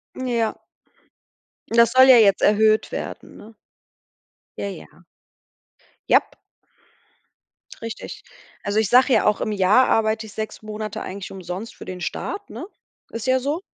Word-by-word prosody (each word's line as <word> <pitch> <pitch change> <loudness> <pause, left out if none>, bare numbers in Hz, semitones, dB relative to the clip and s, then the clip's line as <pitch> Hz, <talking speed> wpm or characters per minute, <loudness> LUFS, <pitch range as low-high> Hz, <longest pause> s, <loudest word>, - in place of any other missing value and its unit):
Ja. 235 -4 -2 1.1
Und 230 - -2
das 235 0 +6
soll 260 +1 +7
ja 250 - +9
jetzt 200 -3 +4
erhöht 215 +1 +3
werden, - - -7
ne? 220 +1 -14 1.0
Ja, 200 - -3
ja. - - -12 1.1
Jap. - - +3 1.5
Richtig. 230 -1 -8 0.4
Also, 205 +2 0
ich 220 - 0
sage 255 +1 +5
ja - - +3
auch, 210 -1 +2
im 215 - -1
Jahr 205 +6 +4
arbeite 220 0 +1
ich 210 - -12
6 215 0 -6
Monate 215 0 -6
eigentlich 190 0 -7
umsonst 190 +3 -7
für - - -11
den 180 -1 -7
Staat, 400 - -5
ne? - - -7 0.5
Ist 230 +2 -6
ja 260 0 +3
so. 290 +7 -2
220 Hz, 145 wpm, -22 LUFS, 205-240 Hz, 1.5 s, ja